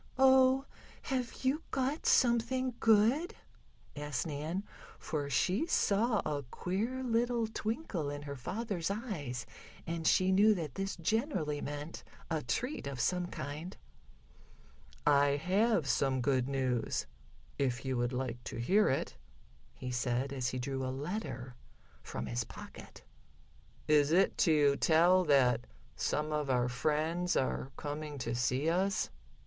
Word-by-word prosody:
"Oh, 265 0 +5 0.4
have 255 -2 -3
you 280 +5 +2
got 270 +4 -1
something 250 +1 +3
good?" 230 - +3 0.6
asked 145 -4 -3
Nan, 160 +5 -3 0.3
for 145 -2 -3
she 190 - +1
saw 215 -2 +2
a 145 -2 -1
queer 225 - -2
little 235 -1 +1
twinkle 220 - -3
in 145 0 -5
her 140 -1 -6
father's 195 - -3
eyes, 175 - -4 0.4
and 165 -1 -2
she 185 0 +4
knew 210 +3 +5
that 155 -7 -4
this 195 0 -3
generally 170 - -1
meant 145 +2 -6 0.3
a 160 -2 0
treat 250 - -2
of 135 -2 -5
some 180 +7 +1
kind. 150 +5 -6 1.3
"I 140 -1 +4
have 190 +3 +2
some 135 -1 +1
good 130 0 +1
news, 130 -4 -1 0.5
if 125 -4 0
you 130 -1 -1
would 120 0 0
like 125 -1 -3
to - - -5
hear 195 - +3
it," 135 - -1 0.6
he 125 - -5
said, 125 +2 -1
as 130 -2 -1
he 130 - -4
drew 135 +1 -3
a 130 - -2
letter 135 - -4 0.5
from 65 - -5
his - - -2
pocket. - - -11 0.8
"Is 150 -1 +4
it 190 +4 +4
to 145 -4 +4
tell 175 +3 +5
that 130 - +3 0.3
some 150 - -1
of 150 -2 -1
our 125 -1 +2
friends 155 +7 0
are 130 0 -1
coming 150 0 -5
to 120 -3 -3
see 125 +4 0
us?" 190 +4 +1
155 Hz, 135 wpm, -33 LUFS, 135-215 Hz, 1.3 s, Oh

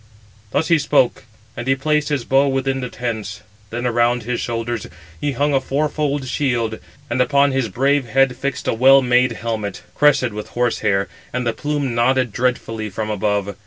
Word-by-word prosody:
Thus 145 +9 0
he 165 -2 +5
spoke; 140 -3 +1 0.3
and 120 +1 -6
he 135 - +3
placed 150 +2 0
his 140 -5 -1
bow 135 +1 +3
within 135 0 0
the 125 - -4
tents. 110 -5 -5 0.3
Then 120 +2 -4
around 120 0 +2
his 120 +1 -2
shoulders 115 -1 -3 0.3
he 145 -1 -1
hung 145 +3 +1
a 135 - +3
four 140 +3 0
fold 145 -3 -1
shield, 120 -5 -1 0.3
and 125 0 0
upon 140 +2 +3
his 130 -4 0
brave 135 +5 +1
head 130 +2 +2
fixed 140 +1 -4
a - - +2
well 135 +4 +6
made 125 0 +3
helmet, 110 -2 -4
crested 135 -5 +3
with 105 0 -6
horse 120 -1 +1
hair, 100 -2 +1 0.2
and 125 0 -2
the 115 - 0
plume 145 -1 -2
nodded 125 +1 +2
dreadfully 115 -3 -1
from 110 +2 -4
above. 100 -1 -1
125 Hz, 185 wpm, -20 LUFS, 115-135 Hz, 0.3 s, well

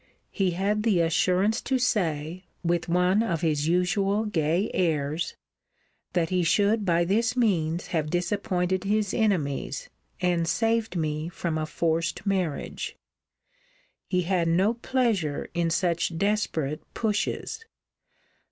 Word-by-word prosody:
He 190 -4 0
had 205 +3 +1
the 210 -5 +2
assurance 185 +6 +2
to 265 - 0
say, 180 -7 -1 0.2
with 170 0 0
one 180 +4 +3
of 170 -9 -1
his 155 -3 +1
usual 195 +4 +1
gay 170 0 0
airs, 155 -1 0 0.8
That 170 -2 +1
he 180 -1 +2
should 205 +5 +2
by 170 -1 +3
this 230 +7 +1
means 175 -8 +1
have 155 -3 -1
disappointed 180 +1 0
his 205 0 0
enemies, 180 - -1 0.3
and 175 -2 +1
saved 225 +3 +1
me 155 -1 -1
from 170 -2 -3
a 155 0 -2
forced 170 +3 -1
marriage. 185 -7 -2 1.1
He 180 -1 +1
had 175 -1 +1
no 185 +7 +3
pleasure 230 - -1
in 170 -1 +1
such 170 -1 0
desperate 165 -7 0
pushes. 220 - -2
180 Hz, 125 wpm, -26 LUFS, 165-205 Hz, 1.1 s, one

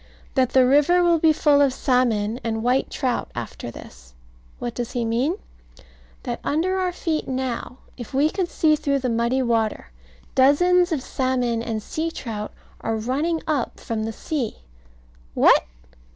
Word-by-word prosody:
That 255 -2 +1
the 260 -1 +6
river 295 +7 +4
will 340 -1 +4
be 320 0 +5
full 295 -2 +3
of 280 -2 +4
salmon 240 -4 +1
and 225 -1 -2
white 250 +2 +1
trout 255 -4 -2
after 120 0 -6
this. - - -13 0.4
What 240 -1 -4
does 240 -1 -4
he 240 -2 -1
mean? 245 +9 0 0.9
That - - -4
under 365 +6 0
our 365 -1 0
feet 325 -3 -2
now, 255 -1 -3 0.2
if 240 -3 -8
we 285 +4 +2
could 375 -3 -2
see 310 -1 +3
through 285 -2 0
the 255 -2 -2
muddy 235 +3 +1
water, 225 - -1 0.4
dozens 355 +7 +4
of 290 -5 -1
salmon 250 -4 -1
and 220 -2 -3
sea 320 +1 -2
trout 220 -9 -6 0.3
are 225 - -2
running 280 +9 -1
up 290 -6 -2
from 220 -1 -3
the 225 - -3
sea. 255 +1 -3 0.8
What! - - +5
260 Hz, 160 wpm, -23 LUFS, 230-310 Hz, 0.9 s, the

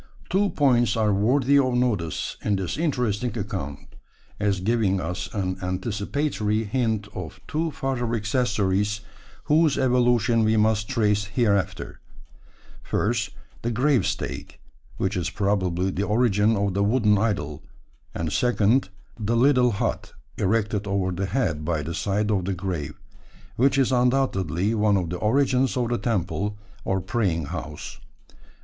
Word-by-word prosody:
Two 200 +2 +2
points 120 - +2
are 105 -2 +2
worthy 130 +7 +3
of 130 -2 +1
notice 105 -11 -1
in 105 - +1
this 95 -3 -2
interesting 125 -7 -1
account, 95 -9 -4 0.6
as 100 -2 +1
giving 100 -1 +1
us 90 +1 -4
an 95 -3 -2
anticipatory 105 +4 -1
hint 110 -2 -1
of 90 -4 -7
two 160 +2 -1
further 125 -5 -2
accessories 105 -3 0 0.4
whose 155 -1 +3
evolution 120 -3 +3
we 110 0 +3
must 110 -1 +2
trace 105 -5 +1
hereafter: 100 -2 -1 0.8
first, 110 -2 -1 0.3
the 120 - -1
grave 125 -1 +2
stake, - - -4 0.4
which 95 +1 -1
is 90 -1 -1
probably 95 -2 0
the 95 - -3
origin 105 0 +2
of 100 -1 0
the 100 +1 +1
wooden 105 -1 +3
idol; 75 -9 -1 0.5
and 80 -1 -2
second, 120 -1 +2 0.3
the 115 +2 0
little 125 0 +4
hut 100 - -2 0.2
erected 105 0 0
over 100 -2 0
the 95 +2 -2
head 90 - -1
by 80 -1 -1
the 85 +3 -4
side 105 +4 0
of 95 -4 0
the 95 0 -1
grave, 90 -6 -4 0.6
which 130 +2 +3
is 135 -1 +3
undoubtedly 115 - +1
one 105 -2 +3
of 85 -3 -2
the 90 - -2
origins 130 +3 +2
of 120 -2 0
the 120 - 0
temple, 105 -1 -1 0.3
or 95 0 0
praying 95 - -1
house. 75 -1 -7
105 Hz, 140 wpm, -24 LUFS, 95-120 Hz, 0.8 s, little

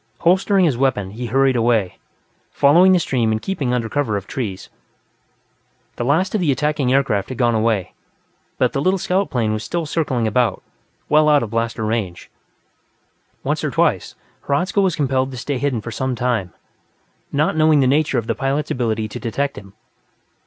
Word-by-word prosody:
Holstering 190 +2 +3
his 135 -7 0
weapon, 110 -8 0
he 120 +3 -5
hurried 135 +2 +2
away, 115 -5 +1 0.5
following 170 +7 +5
the 185 - +5
stream 125 -9 0
and 110 - 0
keeping 145 - -2
under 120 -2 -1
cover 115 -5 -1
of 100 - -6
trees. 105 -7 -5 1.3
The - - -3
last 160 +9 +1
of 215 - 0
the 155 -5 +2
attacking 145 -1 0
aircraft 130 -8 +1
had 130 - -6
gone 120 -2 +2
away, 110 -4 0 0.6
but - - +1
the 135 - -1
little 185 +5 +2
scout 185 +2 0
plane 110 -4 0
was 110 0 -3
still 170 +8 -3
circling 145 -7 -1
about, 115 -1 0 0.4
well 150 0 +4
out 145 -3 +4
of 110 - -6
blaster 115 -1 -2
range. 105 -6 -3 1.1
Once - - -1
or - - 0
twice, - - 0 0.3
Hradzka 180 +8 +1
was 185 -4 +1
compelled 135 -2 0
to 130 - -8
stay 130 +2 -3
hidden 135 -5 -1
for 115 - -7
some 130 +2 -2
time, 115 -7 -1 0.8
not 150 +2 +1
knowing 155 -1 +4
the 135 - +3
nature 140 +1 +2
of 115 - -1
the - - -1
pilot's 135 +2 -2
ability 110 -3 -1
to 105 - -7
detect 140 +5 -2
him. 100 -1 -12
130 Hz, 180 wpm, -20 LUFS, 115-150 Hz, 1.3 s, following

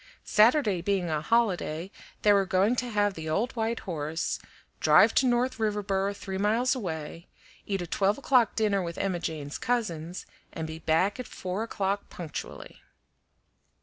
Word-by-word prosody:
Saturday 215 - +4
being 185 -2 0
a 155 -1 0
holiday, 185 -4 0 0.3
they 210 - +6
were 200 -1 +4
going 195 +6 +3
to 250 0 -2
have 205 -2 +1
the 160 -3 -6
old 215 +11 0
white 225 0 -1
horse, 160 -2 -3 0.4
drive - - +6
to 260 - +3
North 245 0 +1
Riverboro 200 -2 0
three 190 -1 -5
miles 225 +6 +2
away, 165 - -5 0.4
eat 195 -3 -1
a - - -5
twelve 195 +4 +1
o'clock 255 -5 +3
dinner 210 -3 +2
with 170 -1 -5
Emma 190 -3 -1
Jane's 150 -4 -5
cousins, 180 -8 -2 0.3
and 160 - -5
be 160 0 -7
back 175 +7 +1
at 255 - -5
four 185 +3 -4
o'clock 200 -3 -2
punctually. 165 -4 -8
195 Hz, 155 wpm, -28 LUFS, 170-220 Hz, 0.4 s, they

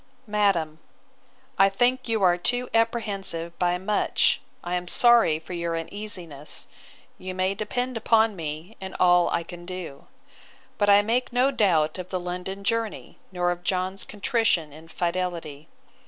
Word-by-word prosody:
'MADAM, 195 -8 +1 0.8
'I 195 0 +7
think 245 +5 +1
you 220 -3 +1
are 175 -1 +5
too 245 +8 0
apprehensive 200 -7 0
by 180 0 +2
much; 205 +3 +1 0.2
I 175 - -4
am 180 0 -2
sorry 235 -8 +5
for 160 +3 -9
your 170 -1 -2
uneasiness. 170 -5 -5 0.5
You 185 0 -6
may 185 +1 +1
depend 245 +4 -3
upon 225 -1 +3
me, 160 +4 -6
and 190 0 -7
all 175 -1 +5
I 170 - -1
can 175 +1 -10
do. 175 -6 -8 0.7
But 205 - +3
I 200 0 +7
make 235 +4 0
no 250 +3 +3
doubt 170 - +2
of 180 0 -6
the 185 - -2
London 180 +2 -5
journey, 230 0 -2
nor 180 -1 0
of 175 0 -4
John's 185 +1 -1
contrition 205 - 0
and 160 +2 -14
fidelity. 170 -4 -3
185 Hz, 150 wpm, -25 LUFS, 170-215 Hz, 0.8 s, I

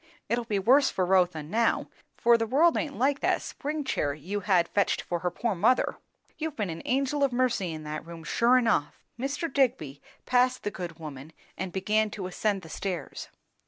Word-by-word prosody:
It'll 235 0 0
be 210 -3 -1
worse 265 +8 +5
for 185 - 0
Rotha 180 -4 +2
now, 225 +9 +1 0.3
for 235 0 +5
the 225 -1 0
world 310 +8 +4
aint 290 -2 -2
like 275 +3 +2
that - - +1
spring 300 +1 -4
chair 145 - -1
you 185 +8 -4
had 180 -3 +2
fetched 200 - +1
for 175 - -2
her 180 - -1
poor 225 +5 -2
mother. 225 +8 +2 0.4
You've 315 -1 -3
been 205 - -2
an 165 - -6
angel 275 +2 +1
of 275 - +3
mercy 240 -8 0
in 155 -1 -6
that 150 0 -5
room, 170 -1 -9
sure 235 +9 +3
enough." 225 -11 0 0.2
Mr. 285 +6 -2
Digby 225 - 0 0.2
passed 255 0 +2
the 205 - -2
good 175 -5 -6
woman 150 -1 -9 0.2
and 185 0 -4
began 215 +3 +1
to 200 -2 -6
ascend 195 +1 -1
the - - -10
stairs. 180 +1 -5
210 Hz, 195 wpm, -28 LUFS, 175-255 Hz, 0.4 s, worse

